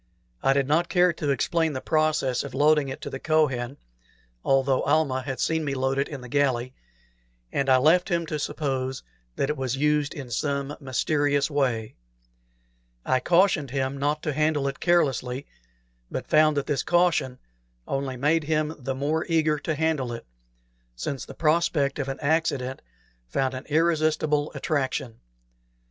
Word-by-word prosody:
I 135 Hz, -, +3 dB
did 135 Hz, -1 st, +1 dB
not 165 Hz, +4 st, +2 dB
care 180 Hz, -1 st, +4 dB
to 150 Hz, -3 st, -3 dB
explain 160 Hz, +4 st, +1 dB
the 130 Hz, -, -3 dB
process 155 Hz, -4 st, +1 dB
of 140 Hz, -, -7 dB
loading 150 Hz, -1 st, +3 dB
it 135 Hz, -, -7 dB
to -, -, -5 dB
the 135 Hz, -, -5 dB
Kohen, 140 Hz, -5 st, +1 dB, 0.7 s
though 135 Hz, -1 st, +2 dB
Almah 145 Hz, -3 st, +1 dB
had 135 Hz, 0 st, -5 dB
seen 160 Hz, -1 st, 0 dB
me 140 Hz, -2 st, -2 dB
load 135 Hz, +1 st, 0 dB
it 140 Hz, -, +1 dB
in 140 Hz, -4 st, -7 dB
the 125 Hz, -, -9 dB
galley, 130 Hz, -2 st, 0 dB, 0.8 s
and 135 Hz, -1 st, 0 dB
I 130 Hz, -, +6 dB
left 160 Hz, +7 st, +4 dB
him 170 Hz, -1 st, 0 dB
to 155 Hz, -1 st, -3 dB
suppose 135 Hz, -3 st, -2 dB, 0.3 s
that 140 Hz, -, 0 dB
it -, -, -3 dB
was 130 Hz, -1 st, -2 dB
used 150 Hz, 0 st, +1 dB
in 135 Hz, -4 st, -7 dB
some 140 Hz, +3 st, -2 dB
mysterious 145 Hz, +2 st, 0 dB
way. 125 Hz, -6 st, -1 dB, 1.1 s
I 130 Hz, -, +2 dB
cautioned 175 Hz, -3 st, +3 dB
him 135 Hz, +1 st, -1 dB
not 145 Hz, +2 st, -1 dB
to 150 Hz, -, -1 dB
handle 150 Hz, -1 st, +1 dB
it 135 Hz, -, -4 dB
carelessly, 140 Hz, -6 st, +1 dB, 0.6 s
but -, -, -4 dB
found 155 Hz, -1 st, +4 dB
that 140 Hz, -, 0 dB
this 145 Hz, -3 st, 0 dB
caution 175 Hz, -7 st, +2 dB, 0.5 s
only 135 Hz, -1 st, -2 dB
made 150 Hz, +4 st, +2 dB
him 155 Hz, 0 st, 0 dB
the 135 Hz, 0 st, -3 dB
more 150 Hz, +4 st, -1 dB
eager 155 Hz, -2 st, +2 dB
to 155 Hz, +2 st, -2 dB
handle 150 Hz, -5 st, 0 dB
it, 115 Hz, -, -8 dB, 0.7 s
since 130 Hz, -, -4 dB
the -, -, -11 dB
prospect 155 Hz, -3 st, +1 dB
of 140 Hz, -, -2 dB
an 135 Hz, -, -4 dB
accident 140 Hz, -4 st, 0 dB, 0.5 s
found 130 Hz, -, -1 dB
an 130 Hz, -, -6 dB
irresistible 155 Hz, -2 st, +1 dB
attraction. 130 Hz, -5 st, -2 dB
145 Hz, 160 wpm, -25 LUFS, 135-155 Hz, 1.1 s, I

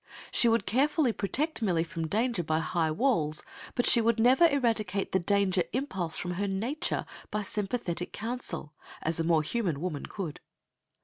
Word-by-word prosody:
She 240 Hz, -, +4 dB
would 230 Hz, +1 st, +2 dB
carefully 270 Hz, -, +2 dB
protect 280 Hz, +10 st, -1 dB
Millie 175 Hz, -6 st, +1 dB
from 165 Hz, -1 st, -4 dB
danger 225 Hz, +2 st, 0 dB
by 155 Hz, 0 st, 0 dB
high 160 Hz, 0 st, 0 dB
walls, 155 Hz, -, +1 dB, 0.3 s
but 245 Hz, -, +1 dB
she 235 Hz, -, +7 dB
would 230 Hz, 0 st, +2 dB
never 260 Hz, +9 st, +6 dB
eradicate 225 Hz, -8 st, 0 dB
the 190 Hz, -, +2 dB
danger 190 Hz, 0 st, +2 dB
impulse 190 Hz, -, -1 dB
from 180 Hz, -, -3 dB
her 200 Hz, +3 st, -2 dB
nature 235 Hz, -, -2 dB, 0.2 s
by 210 Hz, 0 st, -2 dB
sympathetic 195 Hz, -4 st, -2 dB
counsel, 220 Hz, -10 st, -4 dB, 0.3 s
as 165 Hz, +1 st, -1 dB
a -, -, +1 dB
more 165 Hz, -2 st, +3 dB
human 175 Hz, -5 st, -1 dB
woman 155 Hz, -4 st, -4 dB
could. 175 Hz, -7 st, -6 dB
200 Hz, 165 wpm, -29 LUFS, 170-240 Hz, 0.3 s, she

